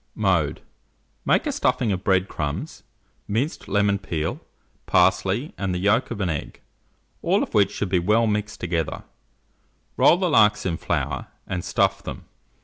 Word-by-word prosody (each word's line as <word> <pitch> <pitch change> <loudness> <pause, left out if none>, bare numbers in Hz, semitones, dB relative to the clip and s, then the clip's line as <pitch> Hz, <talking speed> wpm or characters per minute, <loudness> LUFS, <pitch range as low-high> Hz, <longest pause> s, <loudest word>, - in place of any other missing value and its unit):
Mode. - - +1 0.6
Make - - +3
a 295 - 0
stuffing 125 - +1
of 95 -1 -2
bread 95 -1 +2
crumbs, 75 -4 -4 0.5
minced 120 +10 -2
lemon 100 0 +2
peel, 80 -4 -3 0.5
parsley, 95 - +2
and 95 -2 -1
the - - -1
yolk 100 +7 +2
of 115 - -5
an 95 - +1
egg, 75 - -5 0.6
all - - +2
of - - -7
which 100 -2 +4
should 100 - -3
be 90 -1 +2
well 105 +6 +3
mixed 105 0 -2
together; 85 -3 -2 0.9
roll 170 - +6
the 185 0 0
larks 105 - +4
in 85 -3 -1
flour, - - -2 0.2
and 90 -2 -4
stuff - - +1
them. - - -8
100 Hz, 155 wpm, -24 LUFS, 90-110 Hz, 0.9 s, roll